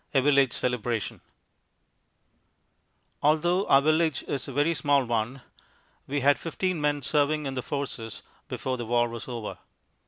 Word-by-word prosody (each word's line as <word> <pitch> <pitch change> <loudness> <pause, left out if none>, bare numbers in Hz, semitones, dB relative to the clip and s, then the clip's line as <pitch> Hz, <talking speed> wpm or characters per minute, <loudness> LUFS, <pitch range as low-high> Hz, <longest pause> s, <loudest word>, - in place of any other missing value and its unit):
A 135 - +6
Village 140 -3 +4
Celebration 120 -3 -2 2.0
Although 175 +6 +2
our 135 0 +6
village 155 -1 +2
is 140 - -3
a - - -5
very 145 +5 +2
small 145 -4 +2
one, 120 +3 -2 0.7
we 145 +1 -1
had 140 +2 +4
fifteen 175 0 -2
men 145 -1 0
serving 150 +2 +1
in 135 - -3
the 130 - -2
Forces 125 -6 -5 0.2
before 130 -1 -3
the 120 - -4
war 120 0 +3
was 115 -1 -7
over. 120 -4 -5
140 Hz, 145 wpm, -27 LUFS, 125-150 Hz, 2.0 s, A